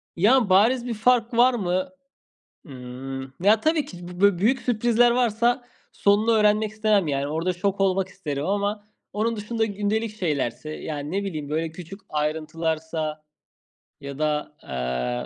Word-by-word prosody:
Ya, 225 +5 +4
bariz 230 +7 +4
bir 245 - -2
fark 235 +2 +2
var 245 +2 +5
mı? 185 +1 -1 0.8
Imm, 130 -1 -8
ya, 215 +2 +5
tabii 310 0 +2
ki 180 - -11
bu 180 +1 -9
bö 200 -3 +4
büyük 235 +8 +2
sürprizler 240 0 +3
varsa 240 +1 +1 0.3
sonunu 205 +3 +2
öğrenmek 215 -1 +3
istemem, 215 -5 +1
yani. 140 0 -1
Orada 165 +4 -1
şok 195 +2 -2
olmak 190 -1 +2
isterim 150 -7 -4
ama 205 +1 -1 0.3
onun 225 +2 -1
dışında 220 +2 -1
gündelik 210 +1 -2
şeylerse, 150 - -2
yani, 150 -1 -5
ne 200 +3 -1
bileyim, 155 -7 -5
böyle, 160 +1 -1
küçük 180 +4 -10
ayrıntılarsa 155 0 -2 0.8
ya 140 0 -7
da, 150 -1 -1
aaa, 60 -1 -3
195 Hz, 145 wpm, -24 LUFS, 155-220 Hz, 0.8 s, var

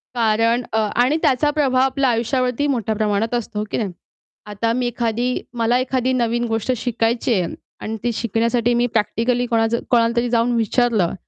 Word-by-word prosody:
कारण 230 +1 +2
अ, - - +1 0.2
आणि 255 +6 +3
त्याचा 295 -1 +2
प्रभाव 275 -4 +2
आपल्या 265 0 +2
आयुष्यावरती 250 +3 0
मोठ्या 230 -6 -1
प्रमाणात 215 +1 0
असतो, 230 -3 -3
हो 210 - -2
की - - -1
नाही? 205 -5 -2 0.5
आता 210 +2 -2
मी 250 0 0
एखादी 240 +1 -1 0.2
मला 230 +1 +2
एखादी 255 0 0
नवीन 240 -1 0
गोष्ट 225 +2 -1
शिकायची 235 +1 0
आहे 180 -5 -1 0.3
आणि 220 +1 -4
ती 240 - +1
शिकण्यासाठी 230 +2 0
मी 240 +1 +2
प्रॅक्टिकली 235 +3 0
कोणाचं 230 0 +1
कोणालातरी 235 0 +2
जाऊन 235 0 +2
विचारलं, 225 -4 +1
235 Hz, 165 wpm, -20 LUFS, 225-250 Hz, 0.5 s, आणि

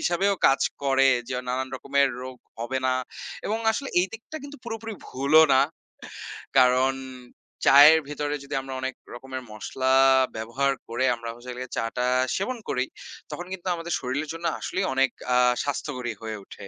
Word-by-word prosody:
হিসাবেও 195 +3 +2
কাজ 135 - +4 0.2
করে 135 0 +4 0.2
যে 130 - -3
নানান 130 +1 -1
রকমের 140 +1 +2
রোগ 130 0 -7 0.2
হবে 130 +3 -2
না। 130 - +2 0.5
এবং 220 +2 -1
আসলে 275 +5 -3
এই 180 - +1
দিকটা 230 +7 -9
কিন্তু 285 +1 -9
পুরোপুরি 225 -1 -5
ভুলও 140 +5 +5
না। 130 - +6 1.0
কারণ 130 +1 +5 0.7
চায়ের 145 +4 +9
ভেতরে 150 0 -2
যদি 140 +1 -8
আমরা 135 0 -7
অনেক 130 0 -2 0.2
রকমের 130 +1 -7
মশলা 130 +5 -2 0.4
ব্যবহার 120 +5 0 0.2
করে 120 +3 -1
আমরা 115 0 -7
হচ্ছে 120 +1 -11
হল 125 - -8
গিয়ে 130 - -6
চা - - 0
টা 125 - +1 0.3
সেবন 250 +6 -2
করি 125 -1 0 0.5
তখন 175 - -5
কিন্তু 190 0 -7
আমাদের 170 0 -4
শরীরের 140 +5 -3
জন্য 165 +1 -7
আসলেই - - -2
অনেক 135 0 +3 0.3
আ - - +5 0.3
স্বাস্থ্যকরী 130 -4 -3
হয়ে 110 -1 -5
উঠে। 100 - -11
135 Hz, 165 wpm, -25 LUFS, 125-160 Hz, 1.0 s, চায়ের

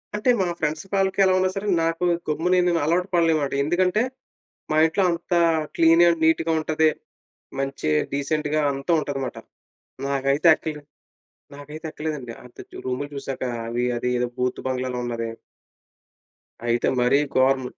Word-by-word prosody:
అంటే, 210 +4 0
మా 185 - +1
ఫ్రెండ్స్ 155 +2 -2
కాళ్ళకి 195 0 +1
ఎలా 190 -1 +4
ఉన్నా 185 0 +2
సరే 195 +1 -4 0.2
నాకు 165 +2 -1 0.3
గమ్మున 165 +4 0
నేను 170 -1 +2
అలవాటు 175 +4 +1
పడలేనమాట. 160 -4 +2
ఎందుకంటే 180 +6 +1 0.7
మా 155 - +1
ఇంట్లో 185 +4 0
అంత 170 +1 -3 0.4
క్లీన్ 165 +1 +5
అండ్ 170 -1 +1
నీట్‌గా 160 0 +2
ఉంటది, 155 0 +2 0.7
మంచి 135 - -3 0.2
డీసెంట్‌గా 150 +2 -1
అంతా 140 +5 -2
ఉంటుందమాట. 135 -3 -4 0.7
నాకైతే 140 +3 +2
ఎక్కలే 150 -2 -6 0.7
నాకైతే 150 +3 -10
ఎక్కలేదండి 150 -7 -5
అంత 125 - -17 0.3
రూములు 130 +3 -2
చూసాక 135 -1 -5 0.2
అవి, 120 +1 -2
అది 120 - -3
ఏదో 125 0 0
బూత్ 125 0 -1
బంగ్లాలో 130 -1 -2
ఉన్నది. 115 -1 -3 1.4
అయితే 120 0 +1
మరి 125 +3 +4 0.2
గోరం, 130 0 +3
150 Hz, 135 wpm, -23 LUFS, 135-170 Hz, 1.4 s, క్లీన్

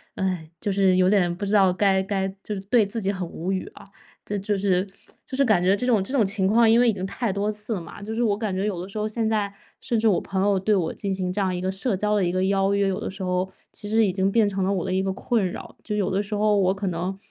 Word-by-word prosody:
唉， 185 -4 -2
就 205 - -1
是 190 -1 +3
有 185 0 +4
点 185 -4 +3
不 195 - -7
知 200 +1 -1
道 190 -3 +5
该 190 0 +2
该 195 -1 -1 0.2
就 210 - -4
是 195 - -4
对 225 -3 +4
自 220 +3 -4
己 195 0 0
很 185 -3 -4
无 170 +3 -4
语 190 -1 -2
啊， - - -13 0.4
这 205 - -3
就 200 +1 -1
是 190 -1 +1 0.4
就 260 - -6
是 275 - +3
感 215 -9 +3
觉 185 +2 +3
这 245 - -3
种 230 -5 +3
这 195 +8 -4
种 245 -6 +3
情 190 -1 0
况 225 +3 +5
因 230 +1 +5
为 245 - +4
已 225 - +3
经 190 -1 -4
太 225 +3 -2
多 200 +2 -1
次 210 +2 -5
了 190 - -3
嘛， 165 +4 -11
就 220 +2 -5
是 240 - +1
我 205 -3 +1
感 210 -3 -2
觉 190 +2 -1
有 190 -5 -2
的 180 - -6
时 200 - -7
候， 210 - -1
现 220 +1 -1
在 210 -2 0 0.3
甚 235 -3 0
至 225 - +2
我 200 - +3
朋 190 -1 -2
友 200 0 +3
对 195 +3 +1
我 180 -5 0
进 200 -2 -3
行 185 -1 -2
这 205 - -1
样 185 -2 0
一 180 - -3
个 185 +1 -2
社 195 +2 -1
交 210 +2 +1
的 205 - +2
一 175 - +1
个 185 +1 0
邀 195 0 +2
约， 200 0 +2
有 190 0 -2
的 - - -3
时 195 +1 -8
候 185 0 -1 0.2
其 205 - -6
实 220 +1 +4
已 190 - 0
经 190 +1 +1
变 220 0 +3
成 195 -1 -1
了 190 - +1
我 185 - -2
的 185 - -2
一 190 +1 +1
个 195 - -1
困 210 +2 0
扰。 - - -9
就 210 - -4
有 200 -3 0
的 195 +2 0
时 210 - -6
候 210 0 +2
我 190 0 +3
可 195 0 -4
能， 180 +2 -3
195 Hz, 335 characters per minute, -24 LUFS, 190-210 Hz, 0.4 s, 道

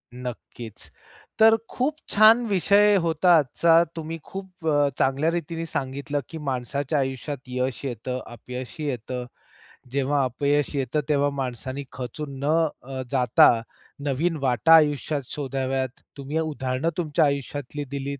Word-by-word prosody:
नक्कीच. 120 -2 -8 0.5
तर 225 0 +7
खूप 275 +5 -1
छान 220 +3 +6
विषय 205 +1 +4
होता 165 +2 +2
आजचा. 165 +4 +4
तुम्ही 165 0 -5
खूप 190 -3 -9
अ, 145 -2 +3
चांगल्या 135 +4 +2
रीतीने 165 0 -3
सांगितलं 140 -1 -3
की 165 - -7
माणसाच्या 140 +1 -2
आयुष्यात 135 +2 -3
यश 125 -1 -2
येतं, 125 +1 -4
अपयशही 125 +5 -7
येतं. 125 -1 -4 0.7
जेव्हा 140 +1 +1
अपयश 145 +3 0
येतं 140 +2 0
तेव्हा 145 -1 +3
माणसाने 130 +2 -4
खचून 135 +2 -6
न - - 0 0.4
अ, 130 +1 -6
जाता 125 -3 +5 0.6
नवीन 160 +5 0
वाटा 135 +5 +4
आयुष्यात 150 -1 +2
शोधाव्यात. 135 -2 -2 0.3
तुम्ही 140 +3 -3
उदाहरण 140 -2 -1
तुमच्या 155 -4 +2
आयुष्यातली 140 0 -3
दिलीत. 140 0 -4
140 Hz, 125 wpm, -25 LUFS, 130-160 Hz, 0.7 s, तर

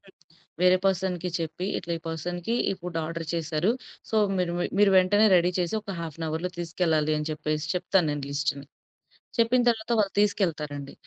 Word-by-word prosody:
హ్మ్. 195 -1 -21 0.5
వేరే 180 0 +6
పర్సన్‌కి 185 -1 0
చెప్పి 165 +3 -4
ఇట్లా, 170 -1 -5
ఈ - - -22
పర్సన్‌కి 175 +6 -3 0.2
ఈ - - +1
ఫుడ్ 175 -1 -6
ఆర్డర్ 165 0 -5
చేసారు. 165 +3 0 0.4
సో, 220 - 0 0.2
మీరు 180 -2 0
మీ 175 - 0
మీరు 205 -1 +6
వెంటనే 205 +4 +4
రెడీ 175 +1 +3
చేసి 175 +3 0
ఒక 200 -3 -6
హాఫ్ 165 -2 -6
ఎన్ 165 - -2
అవర్‌లో 160 +4 -2
తీసుకెళ్ళాలి, 160 -3 +1
అని 150 +1 -3
చెప్పేసి 155 0 -2
చెప్తాను 180 -1 +2
నేను 145 -2 -4
లిస్ట్‌ని. 140 0 -2 0.7
చెప్పిన 235 +2 +4
తరువాత 225 0 -1
వాళ్ళు 200 -2 +1
తీసుకెళ్తారండి. 150 -9 -1
175 Hz, 175 wpm, -26 LUFS, 155-190 Hz, 0.7 s, వేరే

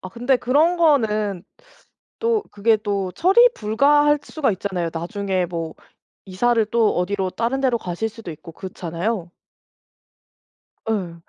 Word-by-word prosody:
어 185 - -8
근데 245 +5 +1
그런 290 +9 +2
거는 215 - +2 0.8
또 455 -2 +1
그게 220 +2 +3
또 200 -3 -2
처리 390 - +5
불가할 290 +7 +3
수가 295 -6 -1
있잖아요. 185 -3 -3
나중에 185 +2 -2
뭐 165 -2 -5 0.5
이사를 225 +5 +1
또 225 0 +1
어디로 190 +1 -1
다른 235 +8 -1
데로 250 -3 +1
가실 180 +4 -3
수도 225 -4 -10
있고 165 +2 -12
그렇잖아요. 180 +2 -4 1.6
예. 185 -6 -2
215 Hz, 260 characters per minute, -21 LUFS, 185-255 Hz, 1.6 s, 처리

